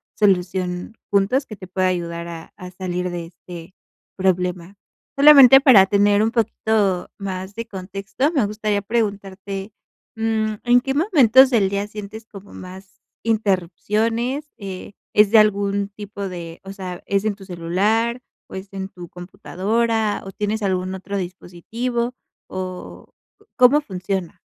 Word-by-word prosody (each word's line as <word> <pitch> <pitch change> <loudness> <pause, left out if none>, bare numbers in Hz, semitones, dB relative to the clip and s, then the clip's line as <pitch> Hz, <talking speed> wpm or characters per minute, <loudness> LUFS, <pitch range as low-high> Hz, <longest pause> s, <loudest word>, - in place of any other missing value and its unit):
solución 180 0 0
juntos 205 +8 +2
que 215 - -9
te 185 -2 -11
pueda 185 0 0
ayudar 170 -1 -3
a 165 -1 -9
a 180 0 -9
salir 180 -1 -3
de 175 -1 -5
este 175 +1 -12 0.4
problema. 180 0 -1 0.4
Solamente 275 -2 +9
para 225 -9 +7
tener 205 +1 +3
un 225 +1 +1
poquito 215 -5 0
más 190 0 -6
de 230 0 -5
contexto, 195 +6 -3
me 260 -8 +2
gustaría 210 -1 -1
preguntarte, 200 -2 -3 0.4
mm, 220 -1 -1
¿en 245 0 +4
qué 270 0 -2
momentos 270 - +5
del 210 -6 +2
día 200 +1 -2
sientes 215 +1 -9
como 200 -2 -13
más 190 +2 -12 0.2
interrupciones, 225 - 0
eh, 195 0 -8 0.2
es 210 0 +5
de 225 - +7
algún 200 -1 +2
tipo 200 -1 -7
de 170 -2 -8
o 195 - -7
sea, 185 -2 -7
es 200 0 0
en 210 -2 0
tu 195 -1 -13
celular, 205 +8 0 0.3
o - - -10
es 190 +1 -7
en 190 0 -5
tu 175 -2 -11
computadora, 210 +5 -1
o 195 - -7
tienes 210 +2 -2
algún 185 -1 -1
otro 200 +2 -5
dispositivo, 230 +7 -4 0.3
o 185 -1 -7 0.4
cómo 255 +4 +6
funciona? 190 - -4
200 Hz, 140 wpm, -21 LUFS, 185-220 Hz, 0.4 s, Solamente